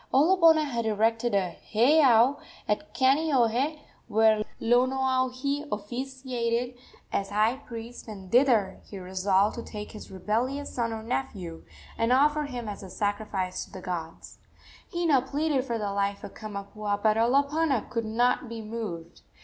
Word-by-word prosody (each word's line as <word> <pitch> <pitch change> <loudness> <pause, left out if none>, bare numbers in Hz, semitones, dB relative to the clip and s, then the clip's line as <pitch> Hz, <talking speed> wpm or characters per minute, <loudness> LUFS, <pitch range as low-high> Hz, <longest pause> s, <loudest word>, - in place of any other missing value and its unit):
Olopana 320 +1 +5
had 235 -5 -2
erected 225 +1 +1
a 185 -3 0 0.2
heiau 255 +1 +5 0.3
at 210 +9 -1
Kaneohe, 270 0 +2 0.3
where 220 -1 +4 0.2
Lonoaohi 260 +3 +1
officiated 245 +2 -3 0.4
as 195 0 -1
high 215 +5 +2
priest, 235 -3 -9
and 195 -4 -9
thither 235 -7 +3
he 200 - -10
resolved 190 +3 +1
to - - -3
take 210 -2 -8
his 215 - -10
rebellious 235 +9 -2
son 235 -2 -1
or 220 -1 -5
nephew, 200 -9 -4 0.4
and 230 +1 +2
offer 295 +3 +3
him 245 -5 -6
as 205 -1 -6
a 190 - -9
sacrifice 205 -2 -2
to - - -15
the 190 - -8
gods. 170 -3 -6 0.5
Hina 335 -7 +3
pleaded 280 0 -1
for 235 -3 -2
the 205 -2 -3
life 200 0 -1
of - - -8
Kamapuaa, 205 0 -4
but 215 -1 +4
Olopana 280 +3 +2
could 230 -2 -1
not 240 +2 +1
be 230 -1 -6
moved. 210 -7 -6
230 Hz, 140 wpm, -27 LUFS, 210-265 Hz, 0.5 s, Olopana